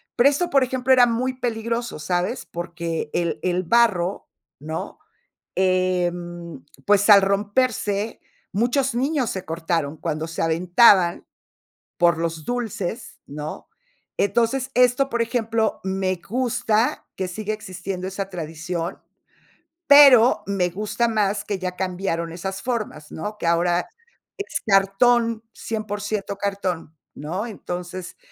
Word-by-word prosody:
Pero 265 Hz, +4 st, +6 dB
eso 345 Hz, +5 st, -1 dB
por 275 Hz, -4 st, +4 dB
ejemplo, 255 Hz, 0 st, -1 dB
era 250 Hz, -1 st, +7 dB
muy 250 Hz, +2 st, -1 dB
peligroso, 230 Hz, -4 st, -2 dB
¿sabes? 180 Hz, -, -2 dB
Porque 170 Hz, -2 st, -4 dB
el 170 Hz, -1 st, -1 dB
el 180 Hz, 0 st, +1 dB
barro, 200 Hz, -2 st, +2 dB, 0.3 s
¿no? 155 Hz, +3 st, -6 dB, 0.6 s
Em, 175 Hz, -4 st, -1 dB, 0.2 s
pues, 205 Hz, +1 st, +3 dB
al 200 Hz, -1 st, +9 dB
romperse, 205 Hz, +1 st, 0 dB, 0.3 s
muchos 245 Hz, +6 st, +1 dB
niños 265 Hz, -1 st, 0 dB
se 190 Hz, -, -5 dB
cortaron 165 Hz, -2 st, -2 dB
cuando 160 Hz, 0 st, -3 dB
se 165 Hz, -, -3 dB
aventaban 175 Hz, +2 st, +4 dB, 0.7 s
por 170 Hz, -2 st, +3 dB
los 165 Hz, -2 st, -3 dB
dulces, 225 Hz, -2 st, -4 dB
¿no? 150 Hz, +2 st, -7 dB, 0.5 s
Entonces, 235 Hz, +6 st, +1 dB
esto, 250 Hz, +2 st, +4 dB
por 235 Hz, -2 st, +1 dB
ejemplo, 225 Hz, -1 st, -1 dB
me 190 Hz, -1 st, -1 dB
gusta 240 Hz, +1 st, 0 dB
que 190 Hz, -, -3 dB
siga 215 Hz, +4 st, -3 dB
existiendo 185 Hz, -2 st, -6 dB
esa 195 Hz, +1 st, -4 dB
tradición, 170 Hz, +1 st, -5 dB, 0.9 s
pero 275 Hz, -4 st, +8 dB
me 190 Hz, -3 st, 0 dB
gusta 215 Hz, +5 st, -1 dB
más 210 Hz, -2 st, 0 dB
que 200 Hz, -2 st, -3 dB
ya 185 Hz, -1 st, -4 dB
cambiaron 180 Hz, -3 st, -2 dB
esas 190 Hz, +3 st, -5 dB
formas, 215 Hz, -11 st, -4 dB
¿no? 210 Hz, +6 st, -5 dB
Que -, -, -3 dB
ahora 175 Hz, +1 st, +2 dB, 0.5 s
es 400 Hz, -, -4 dB
cartón, 225 Hz, +3 st, +3 dB
100% 210 Hz, -2 st, -4 dB
cartón, 185 Hz, -6 st, -3 dB, 0.2 s
¿no? 175 Hz, +9 st, -4 dB
Entonces, 180 Hz, -4 st, -6 dB
195 Hz, 120 wpm, -23 LUFS, 175-230 Hz, 0.9 s, al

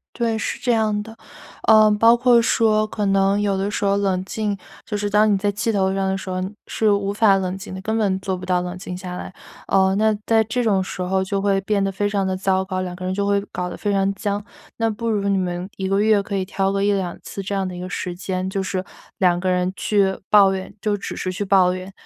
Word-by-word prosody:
对， 230 Hz, -2 st, 0 dB
是 -, -, -3 dB
这 245 Hz, -2 st, 0 dB
样 215 Hz, -2 st, +1 dB
的。 225 Hz, +1 st, -12 dB, 0.5 s
呃， 215 Hz, -1 st, +7 dB
包 225 Hz, +3 st, +5 dB
括 240 Hz, -1 st, +5 dB
说 215 Hz, -2 st, +2 dB
可 210 Hz, -1 st, -3 dB
能 195 Hz, +1 st, +2 dB
有 200 Hz, -2 st, +1 dB
的 195 Hz, +2 st, -1 dB
时 210 Hz, -, -2 dB
候 200 Hz, 0 st, +2 dB
冷 190 Hz, -2 st, 0 dB
静， 205 Hz, 0 st, -2 dB, 0.3 s
就 210 Hz, -, -4 dB
是 205 Hz, 0 st, -1 dB
当 210 Hz, +1 st, +4 dB
你 -, -, +3 dB
在 205 Hz, +1 st, 0 dB
气 220 Hz, +3 st, -1 dB
头 190 Hz, -2 st, +1 dB
上 195 Hz, 0 st, 0 dB
的 190 Hz, -, 0 dB
时 190 Hz, -, -8 dB
候 185 Hz, -, -2 dB, 0.3 s
是 220 Hz, -1 st, +1 dB
无 200 Hz, 0 st, +1 dB
法 205 Hz, -2 st, +4 dB
冷 185 Hz, 0 st, -2 dB
静 195 Hz, -1 st, -8 dB
的， 190 Hz, -, -6 dB
根 220 Hz, +3 st, -1 dB
本 195 Hz, -3 st, +1 dB
做 190 Hz, 0 st, -2 dB
不 180 Hz, -, -8 dB
到 180 Hz, -1 st, +1 dB
冷 180 Hz, 0 st, -5 dB
静 180 Hz, -1 st, -6 dB
下 180 Hz, -1 st, -6 dB
来。 185 Hz, -, -7 dB, 0.4 s
呃， 190 Hz, 0 st, +3 dB
那 215 Hz, 0 st, +2 dB
在 225 Hz, -1 st, +4 dB
这 245 Hz, +3 st, -1 dB
种 195 Hz, -4 st, +2 dB
时 185 Hz, -, -5 dB
候 190 Hz, +1 st, 0 dB
就 195 Hz, +1 st, -2 dB
会 195 Hz, -1 st, +1 dB
变 200 Hz, 0 st, 0 dB
得 195 Hz, -, -1 dB
非 205 Hz, +2 st, -1 dB
常 200 Hz, -2 st, 0 dB
地 185 Hz, 0 st, -1 dB
糟 190 Hz, 0 st, +1 dB
糕， 185 Hz, -1 st, -3 dB
两 180 Hz, -1 st, -4 dB
个 185 Hz, -, -8 dB
人 185 Hz, 0 st, -1 dB
就 200 Hz, +1 st, -1 dB
会 200 Hz, 0 st, +2 dB
搞 180 Hz, 0 st, -3 dB
得 -, -, -7 dB
非 205 Hz, -, -1 dB
常 195 Hz, 0 st, +1 dB
僵。 205 Hz, 0 st, -3 dB, 0.3 s
那 225 Hz, -1 st, +1 dB
不 230 Hz, +2 st, -4 dB
如 205 Hz, -2 st, 0 dB
你 195 Hz, -, +2 dB
们 180 Hz, 0 st, -3 dB
1 190 Hz, -, -3 dB
个 195 Hz, +1 st, +1 dB
月 210 Hz, -1 st, +3 dB
可 200 Hz, 0 st, -4 dB
以 190 Hz, -, -1 dB
挑 195 Hz, 0 st, -1 dB
个 195 Hz, 0 st, 0 dB
1-2 195 Hz, -4 st, 0 dB
次 200 Hz, -, -6 dB
这 200 Hz, +1 st, -4 dB
样 195 Hz, -1 st, -1 dB
的 180 Hz, -, -7 dB
一 -, -, -7 dB
个 180 Hz, -, -5 dB
时 180 Hz, -1 st, -4 dB
间， 185 Hz, 0 st, -3 dB
就 195 Hz, 0 st, -2 dB
是 190 Hz, -1 st, -3 dB, 0.3 s
两 180 Hz, -2 st, +3 dB
个 185 Hz, +1 st, -1 dB
人 180 Hz, 0 st, 0 dB
去 195 Hz, -2 st, +1 dB
抱 200 Hz, -2 st, +6 dB
怨， 190 Hz, 0 st, -5 dB
就 210 Hz, -1 st, 0 dB
只 200 Hz, -, -6 dB
是 185 Hz, -, -3 dB
去 190 Hz, +3 st, -3 dB
抱 190 Hz, -2 st, +4 dB
怨， 185 Hz, +1 st, -7 dB
195 Hz, 275 characters per minute, -21 LUFS, 190-210 Hz, 0.5 s, 呃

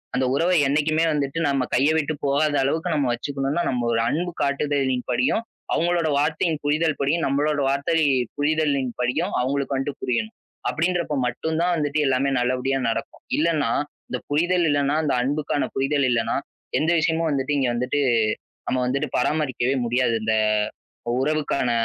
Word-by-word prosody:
அந்த 130 Hz, +1 st, +1 dB
உறவை 175 Hz, +4 st, +2 dB
என்னைக்குமே 155 Hz, +3 st, +2 dB
வந்துட்டு 145 Hz, +1 st, -1 dB
நம்ம 135 Hz, -2 st, +1 dB
கையை 140 Hz, +5 st, +3 dB
விட்டுப் 155 Hz, -1 st, -2 dB
போகாத 145 Hz, +2 st, +2 dB
அளவுக்கு 160 Hz, +6 st, 0 dB
நம்ம 145 Hz, -3 st, +1 dB
வச்சுக்கணும்னா, 140 Hz, +5 st, -2 dB
நம்ம 125 Hz, -2 st, -1 dB
ஒரு 115 Hz, -, +2 dB
அன்பு 175 Hz, +3 st, -1 dB
காட்டுதலின்படியும், 135 Hz, -, 0 dB, 0.3 s
அவங்களோட 170 Hz, -1 st, +1 dB
வார்த்தையின் 155 Hz, +1 st, 0 dB
புரிதல்படியும், 150 Hz, +1 st, +1 dB
நம்மளோட 145 Hz, +2 st, +1 dB
வார்த்தையின் 140 Hz, -3 st, +1 dB
புரிதலின்படியும் 145 Hz, 0 st, 0 dB
அவங்களுக்கு 140 Hz, +1 st, -1 dB
வந்துட்டு 135 Hz, +1 st, -4 dB
புரியணும். 165 Hz, -, -2 dB, 0.3 s
அப்படின்றப்போ 170 Hz, -1 st, 0 dB
மட்டும்தான் 160 Hz, +8 st, -1 dB
வந்துட்டு 150 Hz, 0 st, 0 dB
எல்லாமே 135 Hz, +1 st, +2 dB
நல்லபடியா 130 Hz, +2 st, 0 dB
நடக்கும். 115 Hz, -, -4 dB
இல்லைன்னா, 155 Hz, -6 st, +1 dB, 0.4 s
இந்த 125 Hz, -, -3 dB
புரிதல் 175 Hz, +4 st, +2 dB
இல்லைன்னா, 145 Hz, +1 st, +1 dB
அந்த 145 Hz, -, +1 dB
அன்புக்கான 145 Hz, +1 st, -1 dB
புரிதல் 135 Hz, +1 st, +1 dB
இல்லைன்னா, 115 Hz, -2 st, +1 dB, 0.4 s
எந்த 160 Hz, +3 st, +1 dB
விஷயமும் 160 Hz, 0 st, +1 dB
வந்துட்டு 140 Hz, +1 st, 0 dB
இங்க 130 Hz, -, +1 dB
வந்துட்டு 125 Hz, +4 st, -1 dB, 0.7 s
நம்ம 130 Hz, -, 0 dB
வந்துட்டு 140 Hz, +2 st, -1 dB
பராமரிக்கவே 130 Hz, -2 st, 0 dB
முடியாது. 120 Hz, 0 st, +1 dB
இந்த 110 Hz, 0 st, +1 dB, 0.9 s
உறவுக்கான 150 Hz, -4 st, 0 dB
145 Hz, 135 wpm, -23 LUFS, 130-155 Hz, 0.9 s, கையை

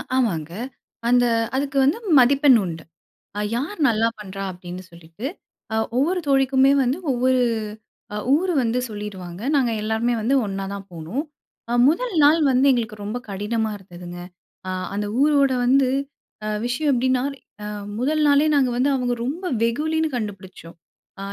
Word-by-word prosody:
ஆமாங்க. 170 Hz, -11 st, 0 dB, 0.6 s
அந்த 245 Hz, 0 st, +4 dB, 0.3 s
அதுக்கு 275 Hz, 0 st, -1 dB
வந்து 285 Hz, +10 st, +3 dB, 0.2 s
மதிப்பெண் 270 Hz, 0 st, +6 dB
உண்டு. 165 Hz, -3 st, -5 dB, 0.5 s
அ -, -, -1 dB, 0.2 s
யார் 310 Hz, +10 st, -3 dB
நல்லா 225 Hz, -2 st, +2 dB
பண்ணுறா 195 Hz, -1 st, -6 dB
அப்படின்னு 180 Hz, 0 st, -8 dB
சொல்லிட்டு, 170 Hz, +8 st, -8 dB, 0.5 s
அ -, -, 0 dB, 0.2 s
ஒவ்வொரு 340 Hz, +8 st, +2 dB
தோழிக்குமே 270 Hz, 0 st, +4 dB
வந்து 255 Hz, +4 st, 0 dB
ஒவ்வொரு 255 Hz, 0 st, +2 dB, 0.7 s
அ -, -, -2 dB, 0.2 s
ஊர் 365 Hz, +3 st, 0 dB
வந்து 240 Hz, +1 st, 0 dB
சொல்லிடுவாங்க, 200 Hz, -4 st, -7 dB
நாங்க 255 Hz, -4 st, +2 dB
எல்லாருமே 220 Hz, +3 st, 0 dB
வந்து 255 Hz, +6 st, +2 dB
ஒன்னா 195 Hz, 0 st, -4 dB
தான் 200 Hz, -1 st, -9 dB
போனோம் 170 Hz, -, -4 dB, 0.6 s
முதல் 395 Hz, -, +1 dB
நாள் 300 Hz, +3 st, +6 dB
வந்து 260 Hz, +1 st, +3 dB
எங்களுக்கு 225 Hz, -4 st, -2 dB
ரொம்ப 210 Hz, +4 st, -3 dB
கடினமா 215 Hz, +3 st, -1 dB
இருந்ததுங்க. 175 Hz, -2 st, -10 dB, 0.5 s
அ -, -, -2 dB, 0.3 s
அந்த 205 Hz, +1 st, -1 dB, 0.2 s
ஊரோட 285 Hz, -2 st, +4 dB
வந்து 260 Hz, +1 st, +4 dB, 0.6 s
அ -, -, -2 dB, 0.2 s
விஷயம் 265 Hz, +5 st, 0 dB
எப்படின்னா 255 Hz, 0 st, +1 dB, 0.4 s
அ -, -, -5 dB, 0.3 s
முதல் 305 Hz, +5 st, +1 dB
நாளே 285 Hz, +1 st, +4 dB
நாங்க 270 Hz, -3 st, +3 dB
வந்து 260 Hz, +3 st, +2 dB
அவங்க 250 Hz, -2 st, 0 dB
ரொம்ப 325 Hz, +9 st, -4 dB, 0.2 s
வெகுலின்னு 315 Hz, +7 st, 0 dB
கண்டுபிடித்தோம். 190 Hz, -6 st, -8 dB, 0.4 s
ஆ -, -, -5 dB
245 Hz, 145 wpm, -22 LUFS, 200-275 Hz, 0.7 s, மதிப்பெண்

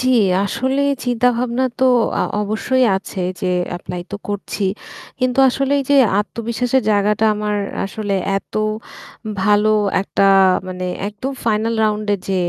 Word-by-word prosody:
জি, 255 Hz, -, 0 dB, 0.4 s
আসলে 260 Hz, +6 st, -1 dB, 0.2 s
চিন্তাভাবনা 245 Hz, +1 st, +1 dB, 0.2 s
তো 260 Hz, -, +3 dB, 0.4 s
আ -, -, +2 dB, 0.2 s
অবশ্যই 225 Hz, +5 st, +1 dB
আছে 190 Hz, -1 st, -6 dB, 0.2 s
যে -, -, -2 dB, 0.3 s
এপ্লাই 180 Hz, 0 st, -6 dB
তো 205 Hz, -, -4 dB
করছি। 205 Hz, 0 st, -4 dB, 0.6 s
কিন্তু 255 Hz, 0 st, 0 dB
আসলে 275 Hz, +2 st, 0 dB
এইযে 275 Hz, +1 st, 0 dB, 0.2 s
আত্মবিশ্বাসের 235 Hz, +4 st, -1 dB
জায়গাটা 210 Hz, +1 st, +2 dB
আমার 210 Hz, 0 st, -2 dB, 0.3 s
আসলে 200 Hz, 0 st, -3 dB, 0.2 s
এত 195 Hz, -, -7 dB, 0.9 s
ভালো 210 Hz, +2 st, +3 dB, 0.3 s
একটা 195 Hz, -, -1 dB, 0.5 s
মানে 185 Hz, 0 st, -5 dB, 0.2 s
একদম 210 Hz, +6 st, -5 dB
ফাইনাল 225 Hz, 0 st, +1 dB
রাউন্ডে 210 Hz, -1 st, 0 dB
যে 195 Hz, -, 0 dB
215 Hz, 125 wpm, -19 LUFS, 205-250 Hz, 0.9 s, তো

